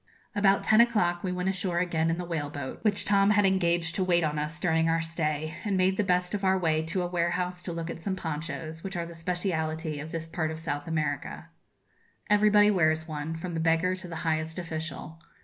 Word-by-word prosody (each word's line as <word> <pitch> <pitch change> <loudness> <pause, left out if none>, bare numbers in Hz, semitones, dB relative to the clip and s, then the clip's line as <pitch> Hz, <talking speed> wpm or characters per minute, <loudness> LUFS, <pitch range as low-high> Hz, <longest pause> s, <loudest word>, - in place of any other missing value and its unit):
About 200 -1 +3
ten 220 +1 +6
o'clock 180 -7 +2
we 185 - -1
went 180 0 -2
ashore 185 -2 -1
again 165 -2 +1
in 165 - 0
the 180 - -4
whale 160 -4 -3
boat, 145 -2 -6
which 205 -2 +2
Tom 200 0 +4
had 205 -1 +4
engaged 170 -3 +2
to 190 - 0
wait 175 -2 +2
on 150 -1 0
us 155 +3 -3
during 165 -2 +2
our 165 0 +2
stay, 155 -1 -2
and 205 -3 0
made 185 +1 +3
the 210 - +1
best 180 -1 +1
of 205 -1 -2
our 190 0 +3
way 160 -3 +1
to 180 +3 -1
a - - -1
warehouse 180 +1 -1
to 175 - -5
look 165 -1 -4
at 165 - -6
some 190 +2 -2
ponchos, 160 -1 -5
which 195 -2 -4
are 170 - -2
the 170 - -9
speciality 165 -3 -2
of 155 +2 -7
this 165 0 -4
part 160 -1 -2
of 160 - -5
South 145 -2 -4
America. 150 -3 -3 0.8
Everybody 210 0 +5
wears 160 -4 +2
one, 155 +1 -4
from 175 +2 -5
the 165 - -2
beggar 165 +3 +2
to 185 0 -7
the 170 - -7
highest 160 +1 -1
official. 160 -1 -6
170 Hz, 220 wpm, -28 LUFS, 160-185 Hz, 0.8 s, ten